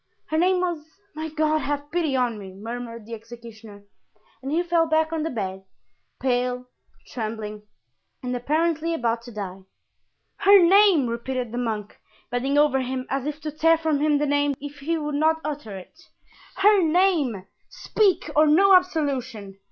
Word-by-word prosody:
"Her 315 - +1
name 365 +1 +3
was——My 335 0 -5
God, 310 0 +1
have 290 0 -4
pity 330 -5 0
on 245 -4 0
me!" 190 -2 -10
murmured 230 +1 -7
the 230 - -9
executioner; 225 -2 -11 0.6
and 270 +1 -5
he 335 +3 +1
fell 340 -1 +2
back 315 0 +1
on 320 - -1
the 320 - -2
bed, 190 -6 -4 0.6
pale, 250 -1 -1 0.4
trembling, 215 -2 -6 0.6
and 250 0 -2
apparently 320 +5 0
about 235 -4 -1
to 240 +1 -11
die. 195 -3 -6 0.8
"Her 400 0 +7
name!" 375 -4 +5
repeated 240 +1 -3
the 240 - -3
monk, 215 -4 -4 0.3
bending 265 +4 0
over 290 -2 +4
him 255 0 -3
as 275 +1 -2
if 300 0 -4
to 305 0 -4
tear 325 +2 +3
from 315 -3 0
him 300 0 +2
the 295 - 0
name 285 0 +1
if 290 0 -9
he 325 +4 -1
would 300 -1 -4
not 315 +2 +2
utter 280 -10 -5
it; 245 - -14 0.5
"her 400 +1 +5
name! 320 - +1 0.2
Speak, 405 -4 +1
or 305 +1 +5
no 385 +6 +5
absolution!" 260 - -1
285 Hz, 160 wpm, -24 LUFS, 235-320 Hz, 0.8 s, Her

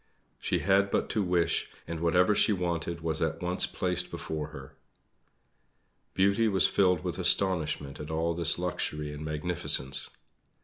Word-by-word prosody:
She - - 0
had 100 +1 +3
but - - -1
to 110 - 0
wish, 90 -3 +1 0.2
and 85 -1 -4
whatever 90 +4 +3
she 105 - +3
wanted 85 -2 -2
was 80 -1 -2
at 80 0 -1
once 90 +1 0
placed 90 -1 -2
before 75 -2 -5
her. 70 -4 -11 1.4
Beauty 100 +4 +3
was 95 -3 +3
filled 90 -4 +2
with - - -4
astonishment 80 -7 +1
at 75 - -7
all 80 +1 0
this 85 -1 +2
luxury 75 -4 -3
and 75 +1 -7
magnificence. 75 -3 +1
85 Hz, 145 wpm, -29 LUFS, 80-90 Hz, 1.4 s, had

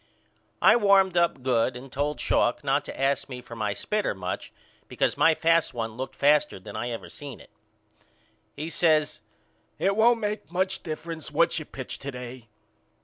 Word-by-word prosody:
I - - +7
warmed 195 -4 +4
up 170 -7 +2
good 125 -1 +1
and 130 +1 -10
told 145 +3 -2
Schalk - - +1
not - - +1
to - - -8
ask 140 +1 0
me 125 -2 -6
for 120 -1 -10
my 105 -2 -2
spitter 210 - -1
much 90 -1 -5 0.4
because - - 0
my 165 - +4
fast 165 -3 +2
one 115 -1 -2
looked 130 +2 -5
faster 150 -5 +3
than 100 +2 -10
I 120 +3 -3
ever 115 -1 -6
seen 140 -4 -9
it. - - -17 1.0
He 155 +3 -5
says 155 -2 +2 0.6
it 195 +1 +1
won't 230 +2 +4
make 210 -5 -3
much 190 +1 0
difference 160 -1 -6
what 170 +3 +2
you 155 - -7
pitch 130 -3 -7
to 140 - -6
day. 125 -2 -8
150 Hz, 175 wpm, -26 LUFS, 125-170 Hz, 1.0 s, I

